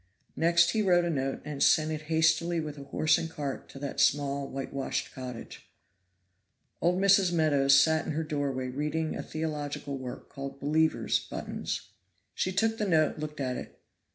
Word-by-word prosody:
Next 170 +1 +4
he 220 - +1
wrote 175 -3 +4
a 170 - 0
note 135 -2 -2
and 150 -2 -5
sent 155 +1 +4
it 155 -1 -3
hastily 160 +1 +2
with 150 -2 -5
a 140 - -9
horse 155 +3 +2
and 165 - -4
cart 145 -4 -5
to - - -11
that 140 0 -5
small 140 -1 +2
whitewashed 135 0 -4
cottage. 125 -3 -8 1.1
Old 180 +2 +2
Mrs. 195 -2 +5
Meadows 140 -5 +4
sat 160 +2 +2
in - - -2
her 160 +2 -1
doorway 140 -4 -2
reading 150 +4 -2
a - - -3
theological 145 -3 -4
work 125 -1 -7
called 140 0 -7
"Believers' 155 +3 +2
Buttons." - - -5 0.4
She 185 - -1
took 225 +4 +1
the 210 - 0
note, 155 -4 +2
looked 150 0 -6
at 130 -2 -2
it. - - -9
155 Hz, 170 wpm, -29 LUFS, 140-165 Hz, 1.1 s, Mrs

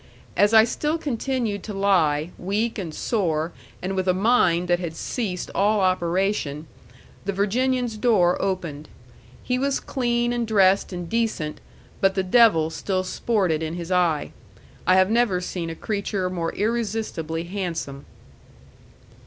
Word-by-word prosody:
As 205 +1 +4
I 220 -1 +8
still 300 +7 -1
continued 250 - -2
to 210 0 -7
lie, 175 -5 +2
weak 215 +5 -1
and 175 -5 -4
sore, 165 -3 -1 0.3
and 190 +1 -2
with 190 0 -1
a 180 - +3
mind 185 -5 +3
that 175 0 +2
had 170 -3 -5
ceased 190 -2 -3
all 210 +2 +2
operation, 185 -4 0 0.6
the 200 - 0
Virginian's 240 +4 0
door 210 -7 +3
opened. 170 -6 -3 0.5
He 250 0 0
was 275 +1 0
clean 240 -2 0
and 240 -1 -1
dressed 195 -3 +3
and 175 -2 -5
decent, 220 -8 -2 0.4
but 195 0 +2
the 190 - +1
devil 185 -6 +4
still 185 +2 -2
sported 185 -5 0
in 160 +1 -3
his 175 +1 -6
eye. 170 -5 +1 0.6
I 185 - +6
have 190 +2 +4
never 225 -6 +2
seen 180 -2 -4
a 165 - -5
creature 200 -1 -2
more 170 -2 -2
irresistibly 210 -7 -2
handsome. 170 -7 -5
190 Hz, 145 wpm, -24 LUFS, 175-225 Hz, 0.6 s, I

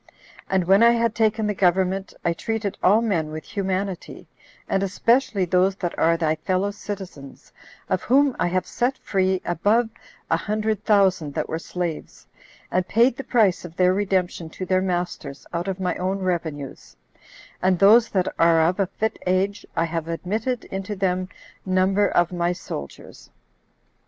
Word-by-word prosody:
And 190 -1 +2
when 195 +4 +4
I 235 0 +7
had 230 -1 +1
taken 220 -1 +1
the 210 - 0
government, 190 +1 +1
I 170 - +2
treated 220 +2 -3
all 210 +5 +4
men 170 -9 0
with 155 0 -6
humanity, 190 -1 -4 0.4
and 195 - 0
especially 205 +1 +1
those 185 +2 +2
that 175 -3 -4
are 165 +1 +3
thy 160 -2 0
fellow 190 +4 -1
citizens, 190 -9 -9 0.3
of - - 0
whom 275 +1 +3
I - - +2
have 185 +1 0
set 255 +2 -1
free 190 -1 0
above 210 +7 +1 0.4
a - - +4
hundred 215 0 -2
thousand 190 -8 +2
that - - -1
were 160 - -3
slaves, 170 -2 -5 0.5
and 185 0 0
paid 235 +3 +3
the 270 - -6
price 215 -9 +2
of 170 -2 -10
their 180 0 +3
redemption 185 -4 -1
to 185 - -6
their 185 0 +2
masters 175 -6 -3
out 170 +2 -2
of 190 -1 -3
my 180 -2 -1
own 190 +2 -1
revenues; 165 -7 -4 0.6
and 185 -1 +3
those 220 +5 +6
that 185 -2 0
are 165 0 +5
of 175 +5 +1
a 195 - +2
fit 220 +4 -3
age, 190 +2 0
I 165 - +2
have 165 -1 -4
admitted 215 +9 -2
into 195 +2 -4
them 185 -1 -1 0.3
number 190 +2 +2
of 175 0 +2
my 175 0 0
soldiers. 75 - -9
185 Hz, 165 wpm, -23 LUFS, 175-205 Hz, 0.6 s, I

